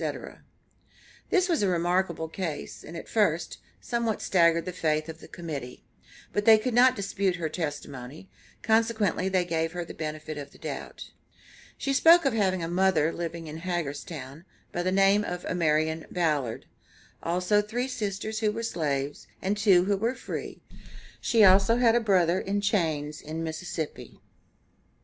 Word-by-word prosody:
This 370 -1 +3
was 335 - +1
a 200 - +2
remarkable 175 -1 0
case, 160 -3 -5
and, 165 - -8
at - - -8
first, 175 -7 0 0.2
somewhat 235 -3 -1
staggered 170 -2 +3
the 180 - -3
faith 155 -2 0
of 160 0 -8
the - - -12
Committee, 145 -8 -7 0.5
but 205 - 0
they 220 -1 +8
could 230 +3 -2
not 250 +2 +6
dispute 200 -2 -1
her 165 -3 -3
testimony, 145 -1 -6 0.4
consequently 220 -4 +2
they 185 -2 +1
gave 165 -1 -1
her 175 -1 -4
the - - -9
benefit 155 -1 -5
of 140 0 -9
the - - -16
doubt. - - -7 0.7
She 275 - -1
spoke 330 +4 +6
of 270 - +2
having 190 -5 +1
a - - -2
mother 175 -3 +2
living 170 -1 -5
in 155 0 -7
Hagerstown, 155 -4 -5 0.3
by 175 - -2
the 185 +1 0
name 195 +2 +4
of 180 -2 -5
Amarian 160 -2 0
Ballad, 150 -9 -1 0.6
also 180 +4 +2
three 235 +5 -3
sisters 215 -3 -3
who 215 -2 +1
were 230 +2 -5
slaves, 145 -8 -2
and 195 +2 -1
two 195 -4 +4
who 200 0 +1
were 230 +6 -1
free; - - -7 0.6
she 225 -2 +3
also 195 +3 +6
had 240 -2 +4
a 240 - +4
brother 185 -5 +3
in 200 +1 -1
chains 160 -8 -1
in 160 +2 -5
Mississippi. 160 -1 -5
180 Hz, 160 wpm, -27 LUFS, 160-205 Hz, 0.7 s, they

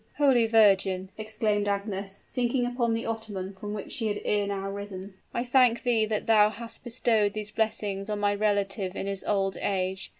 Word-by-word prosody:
"Holy 265 -6 +4
Virgin!" 195 -4 +3
exclaimed 215 -1 -1
Agnes, 200 -1 -3
sinking 245 0 0
upon 240 -2 0
the 225 - -3
ottoman 210 -4 -4
from 205 +2 -7
which 210 -1 -6
she 225 - -1
had 205 -1 -1
ere 205 -1 +1
now 195 -1 -3
risen, 200 -1 -6 0.2
"I 235 - -1
thank 250 -2 +3
thee 230 -3 +3
that 215 -1 -2
thou 210 -2 +5
hast 230 +1 -8
bestowed 225 -4 +1
these 210 -1 -4
blessings 210 -2 -1
on 210 -1 -2
my 205 0 +2
relative 200 -2 0
in - - -3
his 195 -1 -3
old 195 -2 0
age. 190 -1 -2
210 Hz, 180 wpm, -27 LUFS, 195-225 Hz, 0.2 s, thou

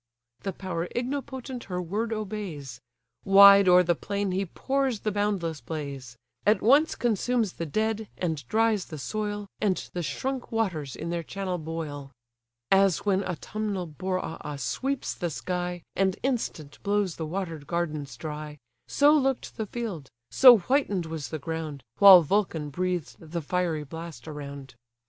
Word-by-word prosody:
The 195 - -3
power 180 -2 -4
ignipotent 260 0 -4
her 180 -2 -3
word 205 +6 -2
obeys: 190 - -5 0.4
Wide 200 0 +8
o'er 180 0 +7
the 175 0 +2
plain 200 +3 -2
he 190 +1 -1
pours 265 +2 -1
the 215 - -1
boundless 195 -7 -1
blaze; 135 -3 -6 0.3
At 210 -1 +4
once 285 +8 +5
consumes 235 -2 0
the 165 - -5
dead, 220 +5 -1
and 160 -5 -2
dries 220 - +2
the 155 - -8
soil 205 +5 -3
And 195 -3 +1 0.2
the 175 - -2
shrunk 255 - -3
waters 180 - -1
in 170 +2 -5
their 170 0 -1
channel 185 +1 -4
boil. 155 -3 -5 0.6
As 195 -2 +4
when 195 -1 +2
autumnal 195 +2 -3
Boreas 160 -4 -4
sweeps 270 - -2
the 175 - -3
sky, 175 +1 -3
And 190 -1 +1
instant 225 - -3
blows 200 -3 0
the 160 - -4
water'd 165 -4 -4
gardens 155 -7 -3
dry: 150 0 -6 0.3
So 290 +1 +5
look'd 270 -3 0
the 220 - -3
field, 195 - -5 0.2
so 250 -3 +9
whiten'd 205 - 0
was 160 -2 -5
the 160 - -3
ground, 155 -3 -5 0.2
While 195 -4 +10
Vulcan 160 -4 0
breathed 180 0 -2
the 165 +1 -5
fiery 170 -1 -1
blast 160 -3 -9
around. 140 -3 -8
180 Hz, 150 wpm, -27 LUFS, 160-210 Hz, 0.6 s, While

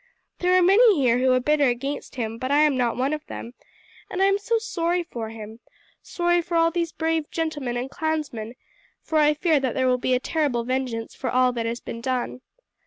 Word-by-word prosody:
There 360 0 +3
are 365 - +4
many 400 0 +5
here 245 -2 +3
who 260 0 +3
are 255 - +4
bitter 290 +2 +2
against 275 +5 -3
him; 225 -2 -4
but 255 0 -3
I 290 +1 +4
am 300 -2 +4
not 245 -2 0
one 265 +4 0
of 305 0 -4
them, 235 - -8 0.6
and 370 - -4
I 385 - +4
am 395 0 +3
sorry 395 -6 -1
for 230 -8 -6
him, 220 0 -9 0.4
sorry 345 0 +1
for 340 0 -2
all 330 0 +3
these 335 -1 -1
brave 320 -2 -1
gentlemen 295 -7 -3
and 245 +2 -3
clansmen, 295 -8 -3 0.5
for 315 - 0
I 300 0 +4
fear 315 -1 +2
that 260 -3 -2
there 260 - +1
will 250 0 +2
be 255 +1 +1
a - - +1
terrible 275 -4 -1
vengeance 250 -2 -3
for 260 - -4
all 255 +1 +3
that 230 -1 -2
has 235 +1 -3
been 230 - -7
done. 255 0 -2
275 Hz, 215 wpm, -24 LUFS, 245-330 Hz, 0.6 s, many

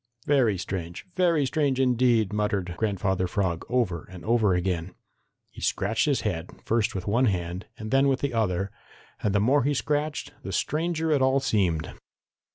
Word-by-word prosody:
"Very 125 -9 +3
strange, 90 0 -5
very 170 -6 +3
strange, 140 -2 0
indeed," 120 -5 +3
muttered 105 -4 -1
Grandfather 95 -3 0
Frog 90 -4 -1
over 115 -10 0
and 90 -1 -10
over 110 -4 +3
again. 90 -1 -2 0.6
He - - -12
scratched 115 +1 +1
his 145 -3 +1
head 90 -6 -3 0.2
first 115 -2 +1
with 95 - -3
one 120 +5 +2
hand 90 -3 -2
and 110 0 -6
then 135 +1 +4
with 135 -1 +1
the 140 -3 -1
other, 100 -4 0 0.5
and 105 -1 0
the - - +4
more 135 +8 +3
he 145 +2 +1
scratched 150 +2 -1
the - - -6
stranger 160 0 0
it 145 -3 +3
all 130 +1 +4
seemed. 95 - 0
110 Hz, 165 wpm, -26 LUFS, 95-135 Hz, 0.6 s, then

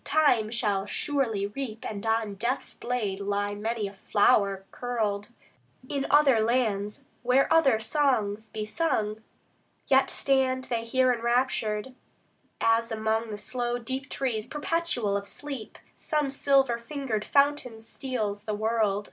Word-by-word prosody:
Time 255 -9 +3
shall 210 -4 0
surely 235 -7 0
reap, 220 +1 -6
And 205 -1 -5
on 225 -2 +1
Death's 235 +7 -2
blade 220 -6 -2
lie 205 0 -1
many 215 +1 -2
a 195 - -9
flower 200 -1 +2
curled, 215 -4 -2 0.6
In 275 0 -2
other 280 -6 +5
lands 215 -4 0 0.2
where 250 +3 +3
other 275 -9 +5
songs 220 -4 0
be 215 -1 -4
sung; 215 -6 -1 0.6
Yet 265 0 +4
stand 260 -1 +1
They 230 -3 -2
here 255 +2 +3
enraptured, 235 -1 0 0.7
as 230 0 +2
among 220 +1 0
The 210 - -5
slow 240 +2 -2
deep 260 +2 -4
trees 240 -5 -2
perpetual 295 -8 -1
of 200 0 -3
sleep 275 -4 -6 0.2
Some 300 -3 -1
silver 270 -3 +3
fingered 235 -4 -3
fountain 280 -5 +2
steals 220 -3 -4
the 215 - -2
world. 215 -2 +1
230 Hz, 130 wpm, -27 LUFS, 210-265 Hz, 0.7 s, other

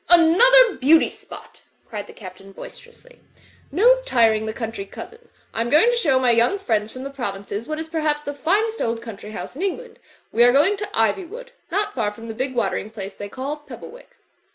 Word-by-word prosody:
''Another 425 +9 +6
beauty 310 +5 +4
spot!" - - -14 0.3
cried 210 -2 -7
the - - -12
Captain, 195 0 -12
boister 485 - -11
ously, - - -20 0.5
'*no - - +4
tiring 225 - +2
the - - -2
country 225 -2 -5
cousin! 455 - -12 0.2
I 225 - -2
am 235 - -2
going 320 - +5
to - - 0
show 295 - +2
my 255 -2 +3
young 235 +12 +3
friends 220 - -1
from 255 - -9
the 275 - -6
provinces 205 -4 -5
what 310 0 -4
is 320 0 -5
perhaps 310 -2 -1
the 285 - -5
finest 420 +10 0
old 230 0 -1
coimtry 210 -2 -9
house 215 - -7
in 305 - -7
England. 435 +5 -4 0.3
We 235 - +4
are 245 - +6
going 300 +10 +3
to 415 - -4
Iv)rwood, 375 - -1 0.2
not 405 +4 -1
far 215 -5 -1
from 225 +2 -11
that 220 - -7
big 260 0 -3
water 235 -4 0
ing 215 - -6
place 200 -3 -8
they 205 +1 -8
call 270 +6 -5
Pebblewick." 300 +10 -13
275 Hz, 205 wpm, -22 LUFS, -, 0.5 s, Another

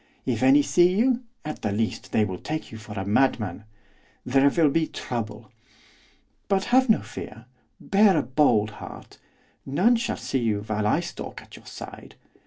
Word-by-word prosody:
If - - -1
any 280 +2 +6
see 180 -6 +3
you, 245 +3 +2 0.2
at 155 - -6
the 105 - -1
least 110 +2 -2
they 110 - +3
will 95 -3 -5
take 155 +1 -5
you 110 - -9
for 105 0 -10
a 95 - -4
madman; 105 -3 0 0.6
there 135 +2 +4
will 155 0 +3
be 160 +1 +1
trouble. 110 -2 -6 1.0
But 195 -1 +1
have 260 -1 +5
no 220 - +4
fear; 115 +2 -9 0.3
bear 200 -3 +4
a 150 - +2
bold 120 -5 +2
heart. - - -11 0.4
None 185 - +3
shall 235 - -2
see 135 - -2
you 110 -4 0
while 105 0 -2
I - - +2
stalk - - -7
at - - -15
your - - -15
side. - - -10
135 Hz, 175 wpm, -25 LUFS, -, 1.0 s, any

